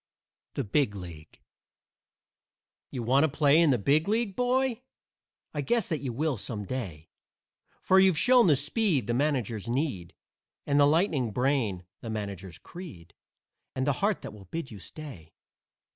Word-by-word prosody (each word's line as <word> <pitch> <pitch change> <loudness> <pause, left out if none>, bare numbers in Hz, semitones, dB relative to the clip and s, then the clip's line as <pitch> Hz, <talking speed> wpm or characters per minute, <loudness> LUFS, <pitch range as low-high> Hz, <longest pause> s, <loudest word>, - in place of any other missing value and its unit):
THE 140 - -1
BIG 110 0 +1
LEAGUE 85 -5 -10 1.5
You 125 - -5
want 130 +5 +3
to - - +4
play 145 +1 +4
in 165 - +4
the 130 - +3
Big 145 - +2
League, 215 -2 0
boy? 250 -1 +1 0.7
I 145 - -2
guess 230 - +1
that 160 -4 -1
you 135 -3 -4
will 145 +2 -1
some 105 0 -5
day, 95 -11 -6 0.7
For 190 - +5
you've 190 -4 +4
shown 245 +4 +5
the 150 - +5
speed 150 - +1
the 120 - -1
managers 120 -6 -1
need 120 - -2 0.5
And 145 0 +2
the 145 - +6
lightning 150 - +2
brain 115 -6 0
(the 115 - -7
managers' 100 -5 -5
creed), 140 - -11 0.6
And 130 - -1
the 145 - +2
heart 205 +1 +1
that - - -7
will 100 -2 -13
bid 135 - -6
you 105 - -9
stay. 105 - -10
140 Hz, 160 wpm, -28 LUFS, 105-160 Hz, 1.5 s, the